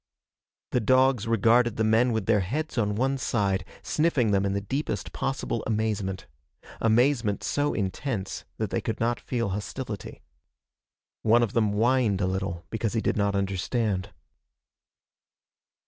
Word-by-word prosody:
The 125 - +2
dogs 130 -1 +3
regarded 115 +1 +3
the 110 - 0
men 115 +3 +3
with 110 -3 -1
their 110 0 +3
heads 145 - -3
on 105 -4 0
one 135 +4 0
side, 100 -6 0 0.2
sniffing 150 -9 +1
them 100 0 +2
in 95 - -1
the 100 - 0
deepest 135 +9 -3
possible 135 -4 -2
amazement 105 -3 -1 0.5
amazement 115 -1 +2
so 145 0 0
intense 100 +1 -3
that - - -2
they - - 0
could - - -3
not 120 +1 0
feel 115 -4 -2
hostility. 105 +1 -5 1.0
One 115 +2 +4
of 110 - -2
them 110 -3 +2
whined 115 -2 +2
a 100 - +1
little 95 -2 -3
because 110 -1 -1
he 115 - +1
did - - 0
not 100 -1 +1
understand. 100 +1 -1
110 Hz, 145 wpm, -27 LUFS, 100-125 Hz, 1.0 s, One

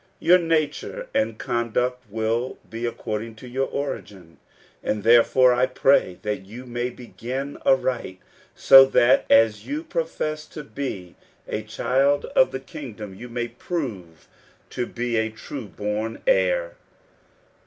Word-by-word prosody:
Your 180 +1 +5
nature 165 - -1
and 275 0 0
conduct 125 +1 -1
will 115 +4 -1
be 115 +1 -4
according 115 -1 -4
to 125 - -12
your 135 +2 -1
origin; 95 -11 -6 0.4
and 105 -1 -2
therefore 120 +2 +6
I 125 +1 +2
pray 130 -8 +2
that 105 -2 -3
you 120 +5 -9
may 120 0 -3
begin 125 +3 -6
aright, 125 -8 +1 0.4
so 135 0 +9
that 130 -1 +3
as 110 -1 +4
you 300 +3 -3
profess 155 - -3
to 150 - -8
be 110 -8 -6 0.3
a 105 - -3
child 130 +6 +1
of - - +5
the 130 - -4
kingdom, 125 - -9
you 120 +6 -10
may 120 0 -3
prove 115 - -6 0.4
to 120 - -3
be 120 -1 -2
a 110 0 +1
true 110 +2 -8
born 105 +3 -4
heir. - - +2
125 Hz, 135 wpm, -24 LUFS, 110-140 Hz, 0.4 s, so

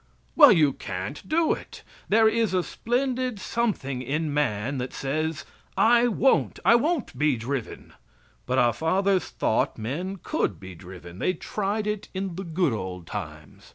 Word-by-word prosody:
Well, 290 -4 +9
you 155 -8 +4
can't 100 +5 -6
do 320 +1 +3
it. - - -9 0.3
There 220 +2 +5
is 220 -3 +1
a 180 - +2
splendid 250 0 -2
something 185 - -2
in 150 +4 -2
man 135 -2 -1
that 125 +1 -4
says: 155 +3 -2 0.3
"I 240 +1 +5
won't; 250 +3 +2
I - - +7
won't 285 - +1
be 150 -4 +2
driven." 125 +2 -5 0.5
But 130 +1 0
our 120 -2 +4
fathers 185 - +1
thought 110 - 0
men 160 - -4
could 90 -7 -1
be 95 0 -9
driven. 90 0 -11
They 185 - +1
tried 205 +4 -3
it 210 -1 -3
in 190 -1 -3
the 190 - -5
"good 165 -5 0
old 95 -4 -5
times." - - -8
160 Hz, 155 wpm, -25 LUFS, -, 0.5 s, Well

